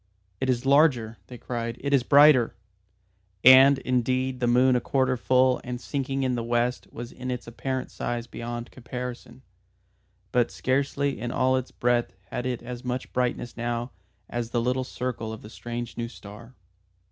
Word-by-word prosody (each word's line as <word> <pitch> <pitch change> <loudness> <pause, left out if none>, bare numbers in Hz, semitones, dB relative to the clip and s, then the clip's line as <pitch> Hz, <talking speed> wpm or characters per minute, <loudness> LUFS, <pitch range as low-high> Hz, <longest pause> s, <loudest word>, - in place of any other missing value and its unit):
"It 130 - -1
is 125 0 0
larger," 135 -7 +3
they 125 - -9
cried. 115 -1 -4
"It 140 +1 -2
is 135 - +5
brighter!" 140 -4 +6 0.9
And, 130 +2 +9
indeed 130 0 0
the 120 - +1
moon 125 +2 +4
a 125 - +1
quarter 130 0 +1
full 130 +1 +3
and 125 0 -5
sinking 135 +1 -2
in 130 -1 +1
the 120 -1 -2
west 120 +1 0
was 120 +1 -7
in 130 0 -7
its 125 -1 -4
apparent 130 +2 -4
size 120 -1 -3
beyond 120 0 -6
comparison, 125 0 -7 0.9
but 120 -1 +2
scarcely 140 0 -1
in 120 +1 -3
all 130 +2 +2
its 130 -1 -2
breadth 120 -6 0 0.2
had 125 - -3
it 125 -2 -3
as 120 0 -7
much 125 +1 -4
brightness 125 -1 -1
now 120 +1 -3 0.4
as 120 -1 -4
the 120 - 0
little 125 +2 0
circle 125 -3 -4
of 110 - -8
the 105 - -11
strange 120 0 -6
new 115 - -2
star. 115 +2 -12
125 Hz, 170 wpm, -26 LUFS, 120-130 Hz, 0.9 s, And